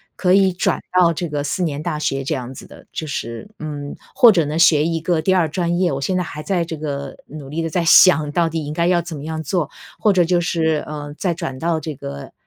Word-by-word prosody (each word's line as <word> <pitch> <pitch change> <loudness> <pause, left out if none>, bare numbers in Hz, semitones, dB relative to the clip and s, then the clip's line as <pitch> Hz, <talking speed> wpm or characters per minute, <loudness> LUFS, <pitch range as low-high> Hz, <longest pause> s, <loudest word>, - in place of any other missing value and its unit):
可 180 -1 +2
以 190 -2 +4
转 190 +1 0 0.2
到 175 -2 +5
这 175 +2 -3
个 145 -1 -3
四 180 +5 -2
年 150 -3 -2
大 155 - -3
学 135 -2 -1
这 150 +3 -1
样 130 0 -6
子 - - -11
的， - - -15
就 155 - -5
是 115 - -5
嗯， 145 -2 -6 0.2
或 235 -2 +7
者 170 -6 +2
呢 155 +3 -2
学 155 -3 +5
一 165 -1 -1
个 165 -1 0
第 190 +4 +2
2 170 -4 +2
专 175 +1 -1
业， 180 -5 +2
我 135 - -2
现 185 +7 -1
在 180 - +1
还 150 -2 -7
在 180 -4 0
这 160 -1 -6
个 140 -2 -5
努 140 -2 -9
力 165 +3 -3
地 165 - -2
在 170 +2 0
想 160 -3 +6
到 170 +1 +2
底 160 -1 -3
应 150 - -5
该 170 +1 0
要 175 -1 +3
怎 165 -3 -7
么 140 - -8
样 160 0 -4
做。 175 -1 -1 0.3
或 210 -2 +3
者 180 -2 +4
就 175 +1 +2
是， 160 -3 0
呃， 145 -1 -6
再 180 -3 0
转 165 -6 -5
到 165 +2 0
这 155 -1 -6
个， 70 - -8
160 Hz, 275 characters per minute, -20 LUFS, 145-175 Hz, 0.3 s, 或